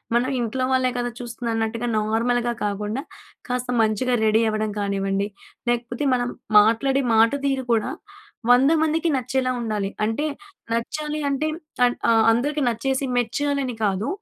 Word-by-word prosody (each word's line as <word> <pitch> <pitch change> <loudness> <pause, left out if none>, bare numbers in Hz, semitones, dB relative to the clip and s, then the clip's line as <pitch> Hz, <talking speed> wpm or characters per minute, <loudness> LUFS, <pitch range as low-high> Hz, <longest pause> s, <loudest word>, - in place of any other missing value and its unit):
మనం 245 +2 +2
ఇంట్లో 240 +2 -1
వాళ్ళే 255 -1 +2
కదా! 245 0 -1
చూస్తుందన్నట్టుగా, 230 -1 -3
నార్మల్‍గా 235 +3 +1
కాకుండా, 210 +4 -2 0.5
కాస్త 250 0 -2
మంచిగా 220 +4 +1
రెడీ 220 +1 +4
అవ్వడం 215 0 -1
కానివ్వండి, 200 0 -1 0.4
లేకపోతే 240 +2 -1
మనం 245 -1 0 0.3
మాట్లాడే 230 +6 +3
మాట 225 +2 +5
తీరు 270 -1 0
కూడా, 220 -2 +1 0.6
100 260 +4 +6
మందికి 320 +2 +1
నచ్చేలా 255 0 -1
ఉండాలి. 210 -4 -2 0.2
అంటే, 225 +7 -1 0.5
నచ్చాలి 300 +6 -2
అంటే 280 +3 0 0.4
అన్ 245 - +1 0.2
ఆహ్, 225 -1 +5
అందరికి 290 +6 0
నచ్చేసి, 265 +4 -1
మెచ్చాలని 265 +2 -1
కాదు. 200 +1 0
240 Hz, 130 wpm, -23 LUFS, 220-260 Hz, 0.6 s, 100